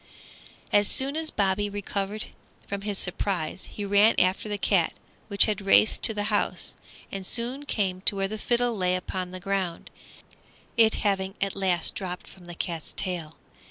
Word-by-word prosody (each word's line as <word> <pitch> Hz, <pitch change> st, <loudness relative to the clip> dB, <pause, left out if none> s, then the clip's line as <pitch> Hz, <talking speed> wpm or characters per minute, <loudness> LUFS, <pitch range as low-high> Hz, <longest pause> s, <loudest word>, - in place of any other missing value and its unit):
As 205 Hz, -1 st, +5 dB
soon 275 Hz, +2 st, -1 dB
as 320 Hz, 0 st, -1 dB
Bobby 200 Hz, +1 st, 0 dB
recovered 205 Hz, +1 st, -3 dB, 0.4 s
from 200 Hz, 0 st, -4 dB
his 205 Hz, -1 st, -2 dB
surprise 185 Hz, -2 st, -2 dB
he 205 Hz, -, -6 dB
ran 205 Hz, +3 st, +5 dB
after 185 Hz, +3 st, +1 dB
the 205 Hz, -, -1 dB
cat, -, -, +2 dB, 0.3 s
which 200 Hz, -2 st, +4 dB
had 210 Hz, -2 st, -1 dB
raced 195 Hz, +2 st, +5 dB
to 220 Hz, -, +8 dB
the 205 Hz, -, -1 dB
house, 205 Hz, -, 0 dB, 0.4 s
and 195 Hz, -1 st, -5 dB
soon 245 Hz, +8 st, -2 dB
came 185 Hz, -6 st, -1 dB
to -, -, +4 dB
where 195 Hz, 0 st, 0 dB
the 215 Hz, +2 st, -6 dB
fiddle 240 Hz, +1 st, +1 dB
lay 180 Hz, -2 st, +1 dB
upon 185 Hz, 0 st, -4 dB
the 185 Hz, 0 st, -8 dB
ground, 190 Hz, -3 st, -3 dB, 0.8 s
it 225 Hz, -1 st, +5 dB
having 195 Hz, -1 st, 0 dB
at 195 Hz, 0 st, -1 dB
last 185 Hz, -3 st, +1 dB
dropped 180 Hz, -2 st, -6 dB
from 185 Hz, -2 st, -15 dB
the 175 Hz, 0 st, -9 dB
cat's 165 Hz, -2 st, -5 dB
tail. 170 Hz, -5 st, -3 dB
195 Hz, 170 wpm, -26 LUFS, 185-210 Hz, 0.8 s, to